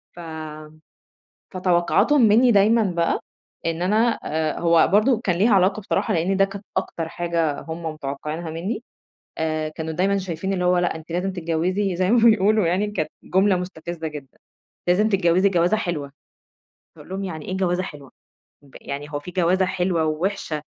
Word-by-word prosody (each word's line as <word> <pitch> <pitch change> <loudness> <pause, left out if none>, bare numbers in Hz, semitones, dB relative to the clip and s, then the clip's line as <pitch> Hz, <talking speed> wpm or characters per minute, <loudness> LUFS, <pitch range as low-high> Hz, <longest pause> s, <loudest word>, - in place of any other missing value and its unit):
ف - - -12 1.4
فتوقعاتهم 185 +10 +2
منّي 240 +4 +5
دايمًا 220 +2 +4
بقى 170 -4 0 0.5
إن 165 +1 -1
أنا 220 +5 +2 0.4
هو 170 -1 +4
برضه 220 +3 +4
كان 180 -3 +1
ليها 210 +4 +4
علاقة 195 +2 +3
بصراحة 200 - -1
لإن 180 +4 +1
ده 195 - +5
كانت 195 +1 -7
أكتر 165 -1 -2
حاجة 165 -3 -1
هم 165 +1 -7
متوقعينها 155 +2 -5
منّي، 185 +9 -4 0.6
آآ، 155 -1 -1
كانوا 160 +1 -5
دايمًا 195 +4 +1
شايفين 185 0 -3
اللي 180 -2 -1
هو 180 0 +3
لأ، 175 -1 0
أنتِ 160 +1 -12
لازم 180 +3 -1
تتجوزي 180 +3 -1
زي 185 +2 +1
ما 245 - +5
بيقولوا 215 -1 +3
يعني 190 +5 0
كانت 155 -7 -2
جملة 190 +1 +2
مستفزة 170 -2 -5
جدًا: 145 -3 -10 0.5
"لازم 210 +5 +3
تتجوزي 190 -1 +3
جوازة 180 +2 +2
حلوة."، 165 -9 -3 0.8
فاقول - - -14
لهم 195 +1 -3
يعني 160 -5 -6
إيه 185 - -3
جوازة 185 -1 0
حلوة؟ 145 -6 -9 0.7
يعني 140 +1 -6
هو 145 - -1
في 145 +5 -9
جوازة 185 +1 +2
حلوة 180 -3 0
ووحشة 155 -1 -2
180 Hz, 160 wpm, -23 LUFS, 160-195 Hz, 1.4 s, منّي